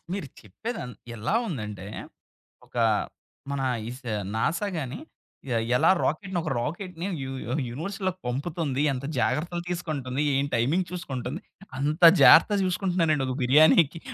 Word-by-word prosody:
మీరు 195 -8 -4
చెప్పేది 220 - -6
ఎంత్ 125 -5 -10 0.2
ఎలా 115 - -2
ఉందంటే 105 - -5 0.8
ఒక - - -25 0.8
మన 140 -1 -2 0.3
ఇస్ 125 +2 -9 0.3
నాసా‌గాని 165 - -2 0.5
ఎ - - +2 0.2
ఎలా - - +4
రాకెట్‌నొక 170 0 -1
రాకెట్‌ని 175 +5 -4 0.2
యు 130 - -5 0.2
యు 120 - -3 0.2
యూనివర్‌స్‌లోకి 185 - -4
పంపుతుంది. 145 +1 -2
ఎంత 130 +1 -5
జాగ్రత్తలు 170 +10 -1
తీసుకుంటుంది? 150 -6 -3
ఏం 140 +1 +1
టైమింగ్ 150 +11 +1
చూసుకుంటుంది? 140 - -5 0.4
అంత 150 +5 -1 0.2
జాగ్రత్తగా 205 -2 +7
చూసుకుంటున్నారండి 175 -6 +1
ఒక 130 - -2
బిర్యానీకి. 155 +4 +5
155 Hz, 120 wpm, -26 LUFS, 130-180 Hz, 0.8 s, జాగ్రత్తగా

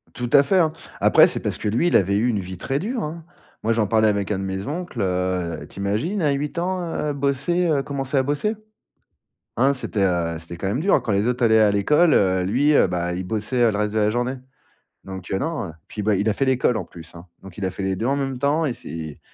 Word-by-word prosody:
Tout 120 -1 -3
à 140 - +7
fait, 190 +6 +2
hein. 160 -3 +3 0.3
Après, - - +6
c'est - - -2
parce - - -2
que - - -4
lui, 115 +11 +1
il - - +5
avait 100 +1 +1
eu 110 +4 +2
une 110 -4 0
vie 95 -1 -7
très 135 +10 -2
dure, 230 - -3
hein. 160 +2 -6 0.4
Moi, 115 - +2
j'en 110 -1 +1
parlais 110 +1 +3
avec 100 -1 0
un 100 - -1
de - - -3
mes 95 0 -4
oncles, 160 -5 -4
heu, 90 -3 -2
tu - - -11
imagines 115 - -1
à 150 -3 +2
8 140 +3 -3
ans, 180 +2 -1 0.3
heu, - - 0
bosser, 140 +6 0
heu, 145 -4 +1
commencer 135 0 -4
à 135 - +3
bosser? 145 +11 -1 1.0
Hein, 135 +3 +4
c'était, 115 -5 -2
heu, 85 -3 0
c'était 85 +1 -9
quand 95 +3 -3
même 110 +8 -1
dur 195 +4 +3
quand 110 - -1
les 100 +2 +1
autres 125 0 +1
allaient 110 -1 +5
à 105 -1 +5
l'école, 150 - +3
heu, 95 -1 +3
lui, 130 +10 +2
heu, - - +5
bah, 90 -1 -2
il 90 +1 -4
bossait 110 +4 +1
le 105 - -3
reste 105 0 -1
de 110 - 0
la 105 -1 +3
journée. 120 +3 -1 0.7
Donc, 95 -1 -8
heu, 95 - +1
non, 160 - -3 0.2
puis, 105 - -6
bah, 105 0 +2
il 100 +3 0
a - - +1
fait 135 - 0
l'école 130 -2 +2
en 110 - -2
plus, 85 0 -13
hein. 85 +1 -11 0.2
Donc, 95 -2 -13
il 100 - -5
a 95 - -1
fait 95 +1 -6
les 95 0 0
2 110 - -3
en 140 +1 +1
même 135 -2 -2
temps 145 +5 +1
et 135 - -1
c'est 80 -6 -8
110 Hz, 260 wpm, -22 LUFS, 95-140 Hz, 1.0 s, à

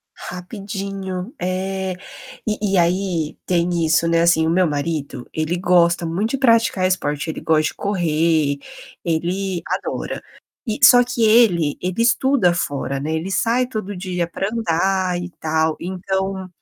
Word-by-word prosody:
Rapidinho. 195 +2 -6
É! 190 +1 -2 0.5
E 210 -2 -1
e - - +4
aí 175 -2 0
tem 175 -1 +1
isso, 160 +1 +3
né, 165 0 +3
assim, 165 -1 +4
o - - +1
meu 180 +2 +3
marido, 145 -4 -3
ele 155 +2 -1
gosta 175 -1 +3
muito 190 +7 -1
de 275 - -1
praticar 230 -7 +3
esporte, 150 -5 -1
ele - - -5
gosta 155 -1 +2
de - - -1
correr, 160 -6 +1 0.5
ele 175 +2 -1
adora. - - -3 0.4
E 220 -4 -3
só 245 0 +9
que 245 -1 -1
ele 215 -10 +4
ele 185 +5 -1
estuda 235 -6 +3
fora, 140 -4 -2
né, 150 +3 -3
ele 170 +4 -4
sai 235 +7 +2
todo 215 -5 -5
dia 180 -2 -3
pra 195 +3 -3
andar 185 -3 0
e 175 - -5
tal, 160 0 +1
então, 190 +1 -3
180 Hz, 150 wpm, -20 LUFS, 165-195 Hz, 0.5 s, só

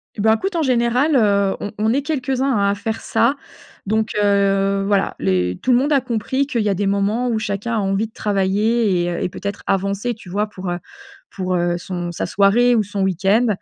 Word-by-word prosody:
Eh 205 - -4
bah, 220 +1 +4
écoute, 385 -1 -3
en 330 - +1
général, 255 +3 +2
heu, 200 -4 +3
on 205 - -5
on 220 +1 +2
est 275 +1 0
quelques-uns 270 -3 -1
à 200 - 0
faire 220 +2 -4
ça. 240 +5 +1 0.5
Donc, 220 +1 0
heu, 195 -1 +2
voilà, 200 -1 +1
les 90 -1 0
tout 255 - +1
le 245 - +5
monde 285 +4 0
a 280 -2 +4
compris 250 +3 -1
qu'il 240 -5 -1
y 210 - 0
a 195 - +1
des 200 +2 -1
moments 200 +5 0
où 225 -2 0
chacun 210 +3 -3
a - - +1
envie 195 +2 0
de 220 - -25
travailler 205 0 +1
et - - -1
heu, 170 - -3
et - - -1
peut-être 200 +2 -6
avancer, 200 +4 -1
tu 215 -4 -14
vois? 205 +4 0
Pour, 190 -3 -7
heu, 175 - -2 0.5
pour, 185 -1 -2
heu, 175 0 0
son 175 -1 -5
sa - - -3
soirée 235 +5 +3
ou 220 - +2
son 205 0 -4
week-end 195 +5 +2
205 Hz, 220 wpm, -20 LUFS, 195-240 Hz, 0.5 s, le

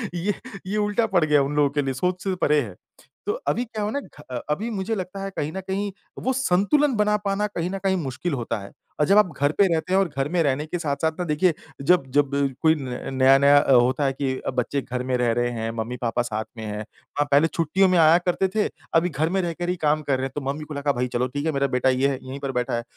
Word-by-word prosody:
ये 185 +4 0 0.3
ये 205 +3 -1
उल्टा 210 +2 +1
पड़ 185 -6 +2
गया 150 -2 +4
उन 140 +2 -3
लोगों 145 -1 +3
के 145 +1 0
लिए, 135 -1 -2
सोच 180 +7 -2
से 190 -2 -1
परे 150 -4 +2
है। 105 -8 -7 0.5
तो 415 - 0
अभी 240 - +1
क्या 220 -2 -5
हो 205 - -1
ना 285 - -1
घ 150 - -15 0.3
अभी 205 +10 -1
मुझे 215 0 -2
लगता 190 0 -5
है 195 - -3
कहीं 150 +1 -2
न 190 - -4
कहीं, 200 +1 -2 0.3
वो 260 - 0
संतुलन 265 +4 +2
बना 210 0 +2
पाना 200 +1 0
कहीं 175 -4 -3
ना 195 - -3
कहीं 190 -1 +2
मुश्किल 145 +1 -3
होता 115 -3 -2
है। 100 - -11 0.3
अ, - - +4
जब 200 +5 +4
आप 210 -4 +5
घर 145 +1 +3
पे 200 - +5
रहते 165 +3 -1
हैं 190 - +5
और 195 - +2
घर 135 0 +1
में 175 +1 +1
रहने 145 +1 0
के 175 +3 -4
साथ-साथ 160 0 0
ना, - - 0
देखिए 160 +3 +2 0.3
जब-जब 140 -3 +2 0.3
कोई 160 -1 +5
न 130 -5 -5 0.2
नया-नया 135 +2 +6
अ, 135 - +3
होता 130 +4 +4
है 135 - +1
कि 135 -1 -2
बच्चे 125 +3 -1
घर 125 -1 -4
में 130 0 -1
रह 120 -1 +2
रहे 120 +1 0
हैं, 115 -1 -3
मम्मी-पापा 120 +1 -2
साथ 110 -2 -3
में 110 - -6
हैं। 105 0 -4
अ, - - -7 0.3
हाँ, 145 - +3
पहले 145 +3 +5
छुट्टियों 170 +4 +2
में 180 - +3
आया 160 +1 +7
करते 185 +2 +2
थे, 215 - +2 0.3
अभी 170 +2 +4
घर 155 +1 -1
में - - +2
रहकर 175 0 -3
ही 180 - +1
काम 150 +1 +3
कर 140 -2 +1
रहे 130 - -2
हैं, 135 - -5
तो 150 - -2
मम्मी-पापा 150 0 -6
का 145 0 +2
भई 125 - +1
चलो 125 +1 +1
ठीक 145 +4 -4
है 160 - +2
मेरा 140 -1 +1
बेटा 130 +1 +3
ये 130 +1 +2
है, 135 -2 -3
यहीं 130 +2 -7
पर 140 -1 -3
बैठा 125 -1 -1
है। 120 - -3
150 Hz, 265 wpm, -24 LUFS, 135-185 Hz, 0.5 s, आया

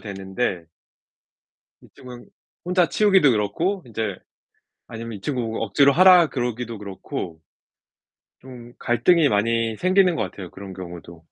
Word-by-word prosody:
되는데 95 -3 -4 1.2
이쪽은 125 -1 -13 0.4
혼자 180 -1 +2
치우기도 190 -10 +4
그렇고 160 - -1
인제 110 -4 -4 0.7
아니면 115 0 -8
이 - - -20
친구 120 -3 -3
억지로 140 0 +3
하라 180 0 +7
그러기도 120 -3 -4
그렇고. 95 -4 -7 1.0
좀 120 -2 -13
갈등이 145 +7 +2
많이 115 +1 0
생기는 185 -1 +3
것 - - 0
같아요, 90 -3 -8
그런 95 -1 -10
경우도. 85 -2 -10
115 Hz, 280 characters per minute, -22 LUFS, 100-150 Hz, 1.2 s, 하라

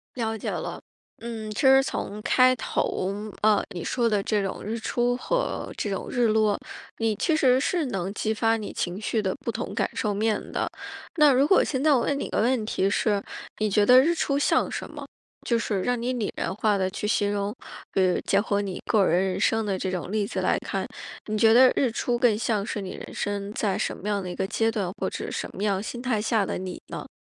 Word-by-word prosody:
了 225 -3 -2
解 - - -4
了。 - - -4 0.4
嗯， 225 -2 -6
其 210 - -3
实 270 0 +7
从 210 -5 -4
开 255 +3 +4
头， 195 -4 -1 0.3
呃， 215 -1 +4
你 175 -4 -5
说 240 -2 0
的 210 -3 +1
这 205 0 0
种 195 - -4
日 220 +3 -3
出 245 +1 0
和 - - -2
这 210 - -3
种 195 - -3
日 245 -2 +2
落， 215 -1 +2 0.4
你 225 -2 +1
其 320 - +1
实 260 -4 +4
是 320 +2 0
能 195 -5 -3
激 215 +1 -1
发 225 +1 +2
你 215 - -6
情 180 +3 -3
绪 220 +1 0
的 190 -3 -1
不 235 - -1
同 - - -5
感 - - 0
受 210 -2 0
面 215 +1 +1
的。 - - -1 0.5
那 300 -3 +6
如 270 +3 +4
果 380 - +5
现 265 -1 -2
在 310 - +5
我 255 - +3
问 280 +4 0
你 - - -2
一 - - -6
个 - - 0
问 240 0 +2
题 195 - +1
是， 200 0 +1 0.3
你 215 - +1
觉 205 0 +3
得 250 +4 +8
日 315 +6 +3
出 280 -4 0
像 285 - +2
什 - - -4
么？ - - -9 0.4
就 235 - +1
是 210 -4 -1
让 245 +4 0
你 245 +2 -1
拟 230 -5 -2
人 - - -2
化 210 0 +1
地 190 -1 +1
去 205 +2 -4
形 205 -1 +1
容， 205 +1 -2 0.4
比 190 - +2
如 180 -1 +2
结 195 - +2
合 205 -1 0
你 195 -3 -4
个 210 -3 +3
人 180 +2 +3
人 185 - -2
生 225 0 +2
的 195 -2 -1
这 190 - -2
种 180 0 -4
例 210 -1 0
子 - - -3
来 - - +1
看， - - -3 0.4
你 215 - -2
觉 220 +1 +5
得 255 +3 +7
日 265 - +2
出 240 +2 -1
更 235 -4 +4
像 215 -2 0
是 210 0 -4
你 190 - -6
人 - - -9
生 205 -1 -3
在 205 -3 0
什 - - -2
么 200 - -7
样 205 -1 0
的 185 - -5
一 180 - -5
个 - - -1
阶 225 +2 +1
段 205 -6 -2
或 - - -1
者 - - -5
什 - - -4
么 200 - -4
样 200 -2 +1
心 240 +3 -6
态 245 -4 0
下 220 -2 +1
的 - - -3
你 185 -1 -6
呢？ - - -7
215 Hz, 260 characters per minute, -26 LUFS, 200-245 Hz, 0.5 s, 得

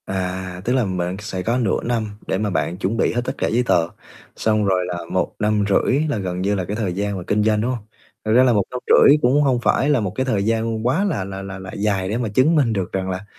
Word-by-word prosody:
À, 95 -1 -4
tức 125 - +1
là 130 -3 +2
bạn 90 -1 -2
sẽ 105 -3 -5
có 115 +4 0
nửa 115 -7 0
năm 115 -2 -1 0.2
để - - 0
mà 105 +1 -1
bạn 90 -2 -1
chuẩn 95 +5 -2
bị - - +1
hết 120 - 0
tất 130 - -2
cả - - 0
giấy 120 +3 +1
tờ, 85 -8 +2 0.5
xong 110 -1 +1
rồi 95 -2 +1
là 90 -1 -3
một - - -1
năm 105 -1 +1
rưỡi 130 +7 +2
là 140 - -1
gần 90 -2 -3
như 100 +2 +1
là 95 -2 -2
cái 100 - -4
thời 105 -5 -2
gian 100 +1 -2
mà 90 - -6
kinh 105 +1 +2
doanh, 105 -1 +2
đúng 120 +3 0
hông? 120 -4 -5 0.4
Thật 110 - 0
ra 125 +3 +6
là 125 -2 +4
một 105 -3 +2
năm 125 - -4
rưỡi 145 - +7
cũng 130 +4 +3
hông 130 -4 +2
phải 140 - +2
là 145 -4 +3
một 100 -4 -2
cái 130 - 0
thời 105 -7 0
gian 115 0 0
quá 160 +10 +2
là 175 - -1
là 95 0 -6
là 95 -1 -7
là 95 -1 -8
dài 100 -2 -1
để 110 - -1
mà 120 -3 -2
chứng 130 +10 +3
minh 130 -7 +2
được 95 -4 -2
rằng 95 0 -2
là 95 +2 -4
105 Hz, 280 wpm, -21 LUFS, 95-120 Hz, 0.5 s, rưỡi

